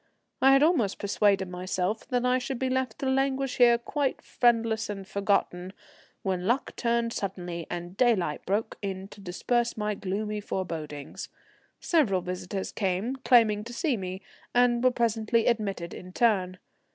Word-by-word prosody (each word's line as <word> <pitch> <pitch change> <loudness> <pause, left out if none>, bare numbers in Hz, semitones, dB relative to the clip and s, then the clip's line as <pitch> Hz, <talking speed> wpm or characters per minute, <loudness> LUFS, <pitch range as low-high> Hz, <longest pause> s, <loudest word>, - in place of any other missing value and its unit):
I 270 +1 +7
had 275 +1 +5
almost 285 - +2
persuaded 200 -1 +2
myself 185 +3 -2
that 250 -2 0
I 250 +1 +3
should 255 +1 -4
be 260 +1 -1
left 260 -3 -1
to - - -4
languish 270 0 0
here 240 -1 +6
quite 275 +3 -2
friendless 230 -2 +1
and 195 -2 -6
forgotten, 195 -2 0 0.5
when 190 -2 0
the 180 - -4
luck 255 +4 0
turned 235 -1 0
suddenly, 180 -4 -4
and 175 +1 -5
daylight 195 -11 +2
broke 210 +4 -1
in 195 -1 -4
to 205 - -13
disperse 235 +6 -1
my 210 0 -1
gloomy 210 +2 -3
forebodings. 160 -7 -5 0.5
Several 235 - +2
visitors 180 +2 -4
came, 200 +6 -1
claiming 225 -5 +4
to 235 +2 -9
see 285 +1 0
me, 190 -1 -6 0.3
and 245 0 +4
were 255 - +6
presently 230 -1 +1
admitted 200 -7 -1
in 185 0 -10
turn. 190 -6 +2
210 Hz, 155 wpm, -28 LUFS, 185-240 Hz, 0.5 s, I